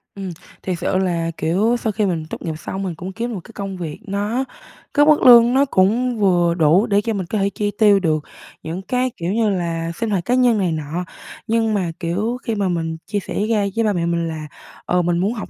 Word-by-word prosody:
Ừm, 195 -2 -5 0.3
thiệt 180 -3 -2
sự 185 +1 0
là, 170 -3 0
kiểu, 200 +9 +1
sau 220 - -1
khi 210 +1 0
mình 170 -5 -1
tốt - - -5
nghiệp 160 - -3
xong 190 +4 -5
mình 180 -3 -3
cũng 185 +3 -7
kiếm 235 +3 -3
một 200 - -4
cái - - -14
công 195 -2 -5
việc 160 -4 -6
nó 205 +6 -1 0.5
cái 290 0 +5
mức 305 0 +4
lương 240 -1 +8
nó 275 +2 +4
cũng 235 +2 +1
vừa 175 -4 +3
đủ, 170 +4 +4
để 205 -2 +3
cho 225 +1 -2
mình 195 -3 -3
có 215 - -2
thể 200 0 +1
chi 205 0 -2
tiêu 205 -2 +6
được 155 -5 0 0.4
những 165 +4 -4
cái, 250 +5 -1
kiểu 175 +3 -2
như 225 -1 +2
là, 170 -3 -2
sinh 230 +3 -2
hoạt 190 -4 -1
cá 245 - +1
nhân 250 -3 +4
này 185 -4 +1
nọ, 160 +3 -3 0.4
nhưng 225 -1 +1
mà, 185 -5 0
kiểu, 200 +8 -1
khi 230 - -2
mà 200 -2 0
mình 165 -2 -2
chia 205 0 -2
sẻ - - -7 0.2
ra 210 -3 +2
với 230 - +1
ba 210 - +2
mẹ 170 -2 -1
mình 170 0 0
là, 155 -2 -5 0.4
ờ, 180 0 +2
mình 175 0 0
muốn 195 +6 0
học 220 - -6
195 Hz, 245 wpm, -20 LUFS, 170-220 Hz, 0.5 s, lương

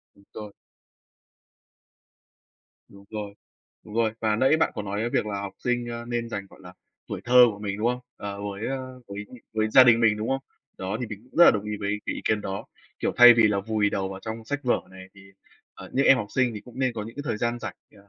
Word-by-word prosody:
Đúng 100 - -22
rồi. 105 -2 -8 2.3
Đúng 100 0 -17
rồi. 105 -2 -6 0.5
Đúng 105 - -11
rồi, 115 -1 +2
và 110 -1 +1
nãy 135 +7 +4
bạn - - +1
có 105 - -4
nói 100 +1 -3
cái 115 +2 -1
việc - - 0
là 100 -1 -3
học 100 -1 -6
sinh, 120 -1 0
a, 120 0 -6
nên 120 -1 -3
dành, 100 -3 -5
gọi - - -17
là, - - -11 0.4
tuổi - - -5
thơ 125 +1 +8
của 100 - -11
mình, 105 -1 -4
đúng 110 - 0
không? 125 0 -2 0.2
Ờ, 100 0 -6
với 100 +1 -4
á, 135 - -2 0.3
với, 100 +1 -6
ưm, - - -12 0.2
với 110 0 +1
gia 130 +2 +8
đình 115 -1 +5
mình, 110 -2 +4
đúng 110 +1 -4
không? 135 0 0 0.4
Đó, 95 +3 -3
thì 125 - -2
mình 105 -1 -8
cũng 125 - -20
rất 175 - +10
là - - +9
đồng 105 -1 -2
ý 105 0 -3
với 105 +1 -2
cái - - -1
ý - - -6
kiến 110 -1 +1
đó. 95 0 -5 0.3
Kiểu, - - -1
thay 120 -1 +10
vì 115 -2 +5
là 100 -1 0
vùi 105 0 0
đầu 95 -1 -2
vào 95 0 -8
trong 110 0 -6
sách 145 +4 -3
vở 125 - +2
này, 95 0 -12
thì, 100 - -15 0.5
ờ, - - -11
những 135 - +2
em 135 - +7
học 105 - -3
sinh 125 -4 +2
thì 105 - -6
cũng 125 0 -13
nên 130 -2 +1
có 110 -2 -5
những 115 - -10
cái 145 - -4
thời - - -1
gian 120 +2 -1
rảnh, - - -6 0.2
ờ, 100 0 -20
110 Hz, 260 wpm, -25 LUFS, 100-120 Hz, 2.3 s, rất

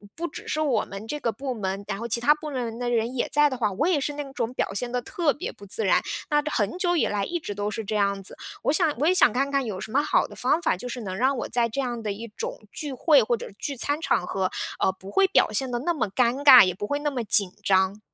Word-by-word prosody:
不 340 +1 -3
只 310 - -10
是 310 - -1
我 265 -8 +1
们 200 +3 -8
这 295 - -3
个 235 -5 -1
部 265 +3 -4
门， 195 -2 -4
然 195 - -3
后 235 +3 -5
其 235 +1 0
他 295 +4 +5
部 300 0 -7
门 235 -4 -3
的 245 0 -1
人 235 +2 0
也 240 - 0
在 295 0 +4
的 260 - -4
话， 210 -4 0
我 260 - 0
也 335 -6 +2
是 290 +2 -2
那 290 0 -4
种 245 -2 -2
表 195 - -2
现 240 +4 -3
得 250 0 -1
特 315 +2 0
别 - - -5
不 200 - -14
自 210 +3 -2
然。 - - +4 0.3
那 295 0 +3
很 210 - -1
久 350 -1 +1
以 - - +2
来 205 -1 -1
一 345 - -3
直 205 -10 -5
都 205 +1 -2
是 225 - -4
这 215 +1 -3
样 200 -1 +1
子。 - - -6 0.3
我 - - +2
想 320 -3 +2
我 300 - +2
也 365 - +5
想 370 - +5
看 275 +2 0
看 275 -2 +1
有 195 -4 -5
什 - - -7
么 280 +4 +3
好 - - +2
的 - - -13
方 295 +7 +1
法， 185 - +1
就 250 - -6
是 245 0 -5
能 190 -3 -5
让 265 +4 +2
我 - - -4
在 235 -1 +2
这 275 +5 -3
样 240 -2 -3
的 210 - -2
一 230 +3 -8
种 - - -4
聚 290 -3 -5
会， 280 0 +4
或 240 +2 +1
者 - - -8
聚 280 - -4
餐 290 +4 +1
场 180 - 0
合， 190 -1 -1 0.3
呃， - - +3
不 190 +1 -12
会 390 -1 +4
表 390 - +3
现 265 -2 -1
得 240 - -1
那 340 +7 0
么 230 -9 -1
尴 250 +6 +1
尬， 260 -4 +10
也 185 - -1
不 205 - -4
会 285 0 -1
那 295 0 -1
么 250 -3 -3
紧 200 -3 +2
张。 190 +1 +2
245 Hz, 320 characters per minute, -25 LUFS, 210-290 Hz, 0.3 s, 尬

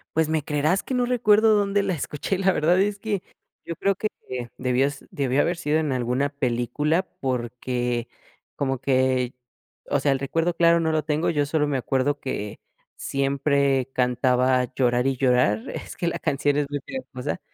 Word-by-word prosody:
Pues 160 -1 +2
me 160 -2 0
creerás 150 +6 +1
que - - -5
no 250 -1 +2
recuerdo 220 -3 +4
dónde 200 -1 +2
la 195 -1 0
escuché. 150 +4 -3
La 195 0 +3
verdad 175 +2 +2
es 205 0 0
que 205 -4 -2 0.4
yo 170 - -4
creo 195 +4 +1
que, 215 - -1 0.2
eh, 125 -2 -4
debió 125 +1 +2
s 140 -1 -7
debió 140 -5 +1
haber 175 +1 0
sido 155 -2 0
en 155 -3 -1
alguna 130 +2 0
película 140 +5 0 0.2
porque 120 -1 -2 0.5
como 135 -2 -1
que 130 -1 +1 0.6
o 145 - +2
sea, 140 - +2
el 135 - +1
recuerdo 165 +6 0
claro 170 0 +4
no 160 -1 +1
lo 155 -1 0
tengo, 150 +2 0
yo 145 -3 +1
solo 150 +1 +1
me 140 -2 0
acuerdo 135 +3 0
que 105 -6 -5 0.4
siempre 140 -1 +1
cantaba 125 0 +2
Llorar 125 0 +2
y 135 - +1
llorar, 125 -4 +2
es - - -7
que 175 - -2
la - - -2
canción 145 +1 0
es 145 -1 0
muy 145 0 -2
pegajosa, 135 - -5
eh, - - -16
140 Hz, 185 wpm, -24 LUFS, 130-165 Hz, 0.6 s, recuerdo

